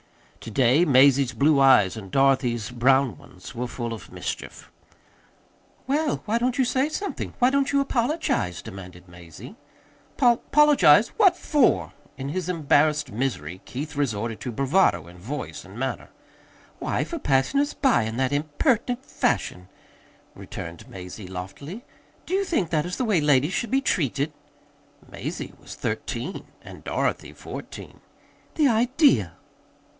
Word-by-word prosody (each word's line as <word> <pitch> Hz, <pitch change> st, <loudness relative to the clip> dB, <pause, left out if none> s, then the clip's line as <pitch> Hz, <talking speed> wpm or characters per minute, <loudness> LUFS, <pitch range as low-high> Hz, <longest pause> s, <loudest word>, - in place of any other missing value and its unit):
To -, -, -9 dB
day 130 Hz, +8 st, +3 dB
Mazie's 135 Hz, -3 st, +4 dB
blue 140 Hz, +4 st, +3 dB
eyes 130 Hz, -8 st, +5 dB
and 100 Hz, -4 st, -8 dB
Dorothy's 130 Hz, -3 st, +1 dB
brown 130 Hz, -1 st, +3 dB
ones -, -, -13 dB
were 125 Hz, +1 st, -3 dB
full 120 Hz, -1 st, -5 dB
of 110 Hz, -, -10 dB
mischief. -, -, -7 dB, 1.1 s
"Well, 290 Hz, +2 st, 0 dB
why 225 Hz, +2 st, 0 dB
don't 245 Hz, +1 st, 0 dB
you 260 Hz, -, +3 dB
say 260 Hz, +4 st, +1 dB
something? 400 Hz, +6 st, -5 dB
Why 250 Hz, +1 st, +3 dB
don't 280 Hz, 0 st, +1 dB
you 280 Hz, -, +3 dB
apologize?" 255 Hz, -, -1 dB
demanded 90 Hz, -4 st, -10 dB
Mazie. 85 Hz, -2 st, -12 dB, 0.6 s
'"Pol 240 Hz, -3 st, +4 dB
pologize? 300 Hz, 0 st, +6 dB
What 380 Hz, -6 st, +5 dB
for?" 290 Hz, -8 st, +2 dB, 0.2 s
In 135 Hz, +1 st, -5 dB
his 180 Hz, +3 st, -3 dB
embarrassed 150 Hz, -4 st, +2 dB
misery 95 Hz, -, -3 dB
Keith 145 Hz, +4 st, -6 dB
resorted 115 Hz, -5 st, -2 dB
to 125 Hz, -, -5 dB
bravado 140 Hz, -, +2 dB
in 90 Hz, +1 st, -14 dB
voice 130 Hz, +11 st, -6 dB
and -, -, -13 dB
manner. -, -, -4 dB, 0.7 s
"Why, -, -, -1 dB
for 335 Hz, -, -6 dB
passing 135 Hz, -, +1 dB
us 290 Hz, +1 st, 0 dB
by 265 Hz, -, +3 dB
in 110 Hz, +1 st, -4 dB
that 130 Hz, +1 st, 0 dB
impertinent 230 Hz, -, 0 dB
fashion," 90 Hz, 0 st, -1 dB, 0.7 s
returned 85 Hz, 0 st, -9 dB
Mazie 90 Hz, +2 st, -9 dB
loftily. 120 Hz, -, -8 dB, 0.4 s
"Do 360 Hz, -, -5 dB
you 390 Hz, +1 st, +2 dB
think 220 Hz, -, -1 dB
that 155 Hz, 0 st, 0 dB
is 180 Hz, -, -4 dB
the 255 Hz, -, -1 dB
way 205 Hz, -8 st, +2 dB
ladies 145 Hz, +3 st, +3 dB
should 235 Hz, -, -2 dB
be 270 Hz, +1 st, +2 dB
treated?" 150 Hz, -, -1 dB, 0.7 s
(Mazie -, -, -6 dB
was -, -, -10 dB
thirteen -, -, -4 dB, 0.2 s
and -, -, -12 dB
Dorothy -, -, -2 dB
fourteen.) -, -, -9 dB, 0.6 s
"The 300 Hz, -3 st, +4 dB
idea!" 235 Hz, -, +3 dB
145 Hz, 145 wpm, -24 LUFS, -, 1.1 s, pologize